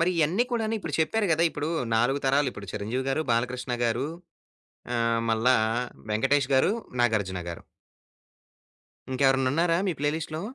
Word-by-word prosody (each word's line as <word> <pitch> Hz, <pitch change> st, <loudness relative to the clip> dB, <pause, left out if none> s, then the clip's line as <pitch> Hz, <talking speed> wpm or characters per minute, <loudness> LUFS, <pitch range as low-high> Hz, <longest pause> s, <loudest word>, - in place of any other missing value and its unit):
మరి 170 Hz, +2 st, +3 dB
ఇయన్ని 170 Hz, +10 st, +2 dB
కూడాను 225 Hz, -1 st, 0 dB
ఇప్పుడు 165 Hz, -7 st, -5 dB
చెప్పారు 205 Hz, +7 st, +1 dB
గదా! 160 Hz, +1 st, +2 dB
ఇప్పుడూ 150 Hz, +1 st, -3 dB, 0.3 s
4 130 Hz, +5 st, +2 dB
తరాలు 140 Hz, +1 st, +3 dB
ఇప్పుడు 100 Hz, -1 st, -10 dB
'చిరంజీవి' 115 Hz, +6 st, -3 dB
గారు 155 Hz, +4 st, 0 dB
'బాలకృష్ణ' 125 Hz, +1 st, -1 dB
గారు 120 Hz, +4 st, 0 dB, 0.9 s
ఆహ్, 115 Hz, -1 st, +1 dB
మళ్ళా 115 Hz, +3 st, +3 dB, 0.5 s
'వెంకటేష్' 135 Hz, +5 st, +2 dB
గారు 135 Hz, +8 st, +4 dB, 0.3 s
'నాగార్జున' 100 Hz, -7 st, 0 dB
గారు. 85 Hz, -, -8 dB, 1.5 s
ఇంకెవరన్నా 135 Hz, -1 st, +3 dB
ఉన్నారా 165 Hz, +2 st, +2 dB
మీ 185 Hz, -, +1 dB
ప్లేలిస్ట్‌లో? 155 Hz, +2 st, -2 dB
135 Hz, 135 wpm, -27 LUFS, 115-155 Hz, 1.5 s, గారు